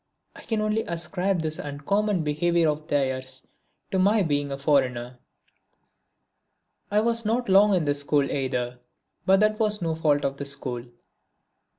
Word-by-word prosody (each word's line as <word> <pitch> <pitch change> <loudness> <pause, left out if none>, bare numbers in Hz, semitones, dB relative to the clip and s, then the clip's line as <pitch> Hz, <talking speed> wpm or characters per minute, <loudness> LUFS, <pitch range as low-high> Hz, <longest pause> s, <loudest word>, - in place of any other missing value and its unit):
I - - -11
can 220 -2 -2
only 215 +1 +1
ascribe 180 +1 -1
this 155 0 -3
uncommon 180 +7 -1
behaviour 165 +3 +1
of 150 +1 -3
theirs 130 -3 -2 0.5
to 190 - +1
my 205 +2 +4
being 145 -3 -1
a 135 - -3
foreigner. 130 -4 0 1.7
I 210 +1 +3
was 230 +1 0
not 235 +3 0
long 200 +1 +5
in 170 -4 +1
this 145 0 +1
school 145 0 +2
either 125 -3 -2 0.5
but 190 +1 +5
that 215 0 +2
was 210 -1 +1
no 165 -2 -1
fault 150 -3 +1
of 135 0 -2
the 140 - -5
school. 135 -3 -4
Mr. 120 0 -18
155 Hz, 160 wpm, -25 LUFS, 140-200 Hz, 1.7 s, long